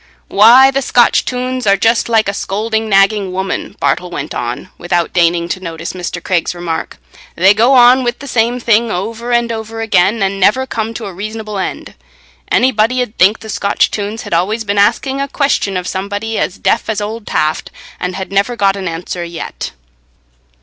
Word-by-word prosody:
"Why, 240 +6 +7
the 275 0 0
Scotch 240 -2 +3
tunes 255 -1 -3
are 200 0 +4
just 225 +4 +2
like 225 -2 +2
a 200 - -1
scolding, 220 +3 -2
nagging 195 -1 +3
woman," 190 +1 -4
Bartle 180 - 0
went 150 -4 -5
on, 120 +8 -4
without 175 -1 -1
deigning 170 -1 +2
to 185 - -3
notice 170 -2 -6
Mr. 175 -1 -5
Craig's 180 -1 -1
remark. 170 -2 -4 0.4
"They 190 +3 +5
go 235 +6 +3
on 250 +1 +6
with 240 0 -1
the 280 - -10
same 240 0 +1
thing 230 -1 +2
over 225 +5 -4
and 235 -1 +1
over 225 0 -6
again, 210 -1 +2
and 195 0 -1
never 210 +7 +3
come 225 -2 -4
to 225 - -5
a 195 - -7
reasonable 215 +2 -5
end. 190 - -5 0.6
Anybody 250 0 +2
'ud 245 -4 -2
think 195 +5 +4
the 220 - -9
Scotch 200 -1 +1
tunes 210 +2 -4
had - - -6
always 205 +7 0
been 200 -1 -1
asking 265 +6 +1
a 280 - -1
question 275 -9 0
of 180 0 -4
somebody 205 +3 -3
as 185 - -2
deaf - - 0
as 215 -2 -1
old 215 +1 -5
Taft, 155 +1 -1 0.3
and 180 0 -3
had 190 -1 -6
never 200 +5 +1
got 195 -4 +2
an 195 -2 -4
answer 175 +1 -4
yet." 170 -1 -6
210 Hz, 190 wpm, -15 LUFS, 185-230 Hz, 0.6 s, Why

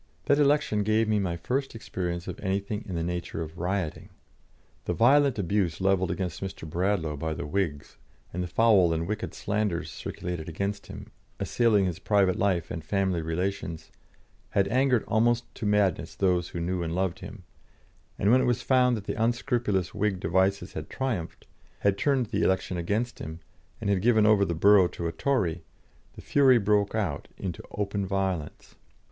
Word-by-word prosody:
That 140 - +3
election 145 -7 +3
gave 110 +2 +2
me 105 -1 +2
my 90 -3 -1
first 130 +8 -2
experience 90 -5 -4
of - - -6
anything 100 +2 -2
in 95 - -4
the 85 - -1
nature 85 -1 -3
of 80 +2 -10
rioting. 90 -2 -2 0.8
The - - -1
violent 135 +2 +4
abuse 95 -4 0
levelled 95 -1 +2
against 90 -3 -3
Mr. 95 -4 -6
Bradlaugh 85 -2 0
by 80 +2 -3
the - - -5
Whigs, 75 -3 -3 0.4
and 90 - -2
the 90 - -2
foul 95 -3 +4
and 85 +1 -2
wicked 105 +2 -4
slanders 105 -4 -1
circulated 85 -3 -5
against 100 +5 -3
him, - - -10 0.3
assailing 110 -5 +2
his 90 -1 -3
private 100 -3 +2
life 95 -4 0
and 80 - -5
family 95 -1 0
relations, 85 0 -3 0.6
had 100 -1 +2
angered 130 0 +2
almost 120 +2 +1
to 105 - -4
madness 105 -4 +1
those 90 -3 +1
who 85 - -5
knew 90 +1 -1
and 85 0 -2
loved 95 0 -1
him; 95 +1 -10 0.7
and 100 - +2
when 130 +1 +5
it - - +1
was 120 0 0
found 125 -2 +3
that 105 - -7
the 110 +2 -2
unscrupulous 120 -5 0
Whig 105 -2 0
devices 95 +2 +1
had - - -6
triumphed, 120 -11 -3 0.4
had 100 -1 +3
turned 135 +2 +1
the 115 - -2
election 95 -1 +1
against 105 +8 -2
him, 80 +1 -7 0.4
and 100 -4 0
given 110 -1 +4
over 105 -2 +5
the 85 - -2
borough 100 +2 +6
to 85 - -6
a 85 - 0
Tory, 90 - 0 0.5
the - - -11
fury 135 -3 +5
broke 105 -1 +1
out 90 -10 -2
into 90 -4 -5
open 100 -1 -2
violence. 95 -5 -3
100 Hz, 175 wpm, -27 LUFS, 90-110 Hz, 0.8 s, borough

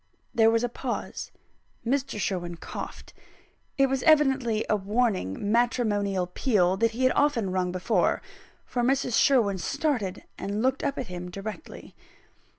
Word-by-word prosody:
There 225 -1 +5
was 230 +1 +2
a - - +2
pause. 245 +1 -5 0.6
Mr. 270 -2 -1
Sherwin 175 -3 -2
coughed; - - -8 0.6
it 275 - +5
was 270 -1 -1
evidently 265 -8 +3
a - - +3
warning 205 - -1
matrimonial 210 -5 +1
peal 185 -1 +1
that 230 +3 +3
he 235 +3 -3
had 255 - +5
often 260 -10 +2
rung 185 -1 0
before 185 +1 +1 0.5
for 245 - -2
Mrs. 255 -1 +1
Sherwin 220 -8 +3
started, 220 - -1 0.2
and 205 +3 -2
looked 260 +1 +1
up 280 - -1
at 260 - -3
him 180 -2 -7
directly. 200 - -8
225 Hz, 145 wpm, -27 LUFS, 190-255 Hz, 0.6 s, There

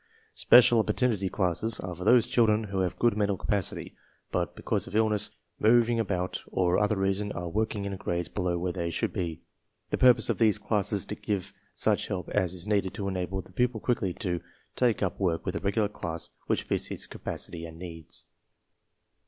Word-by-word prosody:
Special 120 -1 +6
Opportunity 105 -3 +1
Classes 100 +4 -1
are 90 -1 -5
for 90 - -7
those 120 +2 +5
childre 110 -3 +4
n 110 - -2
who 95 - -1
have~good 95 +5 +1
mental 100 -2 +1
capacity, 100 -1 -2 0.4
but - - -1
because - - -2
of - - -8
illness, 105 -1 +2 0.3
moving 115 +1 +4
about, 95 -4 -2
or 90 -1 +2
other 105 0 +1
reason 95 +1 0
are 90 0 -4
working 105 +2 -1
in 100 -1 -3
gnytes^ 85 0 -3
"Below 90 -3 0
where 90 +1 -1
they 85 -2 -3
should 100 +3 -2
be. 85 -4 -4 0.5
The - - 0
purpose 125 -2 +6
of - - -1
these 110 -3 +4
classes 105 -1 0
is - - 0
to - - -5
give 100 -4 -3 0.2
such - - +1
help 90 -4 -4
as 95 -4 +1
is 90 -1 -1
needed 100 -3 0
to 100 -2 -3
enable 95 0 -3
the - - -18
pupil 125 +3 0
quickly 105 -5 0
to 90 -5 -2 0.3
take 120 -4 +2
up 95 - -2
work 85 -4 0
with 95 -1 -2
a - - -1
regular 100 +2 +1
class 85 -5 -3 0.2
which - - +1
fits - - -1
his - - -3
capacity 85 -1 -5
and 80 0 -11
needs. 85 -2 -4
100 Hz, 195 wpm, -28 LUFS, 90-110 Hz, 0.5 s, Special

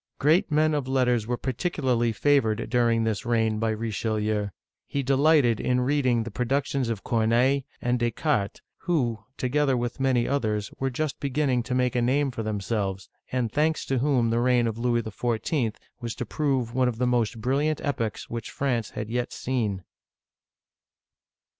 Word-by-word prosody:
Great 165 +8 +3
men 155 +1 +3
of 145 -3 -1
letters 125 -4 +1
were 120 0 -1
particularly 130 -4 0
favored 115 -3 +1
during 115 -2 +3
this 110 -2 -1
reign 110 -2 +1
by 115 0 +1
Richelieu. 110 -1 -1 0.4
He 140 - -2
delighted 135 -3 +4
in 125 0 +1
reading 130 -3 +2
the 115 - -7
pro 125 - -1
ductions 135 -1 0
of 110 -4 -3
Corneille 115 0 +2
(c6r 135 +3 +3
na'y') - - -12 0.2
and 125 0 +1
Descartes 120 -2 0
(da - - -14
cart'), 120 -11 0 0.2
who, 125 -11 0 0.2
together 135 +1 +1
with 120 +1 -3
many 130 -3 +2
others, 110 -7 -1
were 135 - 0
just 150 +3 -3
beginning 140 -2 +1
to 125 +2 -3
make 125 0 +1
a 120 - +2
name 135 +3 +2
for 115 - -4
themselves, 100 -2 -2 0.2
and 125 -3 -1
thanks 155 +2 +1
to 135 -2 0
whom 125 -4 +2
the 115 - +2
reign 125 -1 +3
of 115 0 -2
Louis 120 -1 +1
XIV. 115 +2 -1 0.2
was 120 -2 -4
to 125 - -4
prove 130 -3 -1
one 130 0 +2
of 120 -2 -2
the 125 - +1
most 120 -2 +1
brilliant 140 +6 0
epochs 115 -7 -2
which 115 -1 -5
France 125 -6 -1
had 105 - -5
yet 120 +2 -2
seen. 110 -8 -2
120 Hz, 180 wpm, -26 LUFS, 115-135 Hz, 0.4 s, delighted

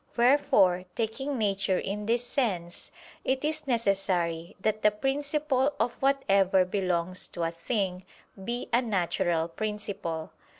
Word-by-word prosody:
Wherefore, 235 -8 +4
taking 255 +5 -2
nature 195 -3 +1
in 205 +3 -3
this 235 +1 +1
sense, 185 - -2 0.3
it 265 +2 0
is 305 -1 -1
necessary 190 -8 0
that 215 +2 0
the 210 - +6
principle 280 +4 0
of 240 - +1
whatever 200 -9 +3
belongs 180 -2 0
to 170 - -5
a 165 - 0
thing, 185 +1 -2 0.4
be 240 +3 -3
a 240 - +5
natural 175 -6 0
principle. 195 -4 -4
205 Hz, 125 wpm, -28 LUFS, 180-250 Hz, 0.4 s, the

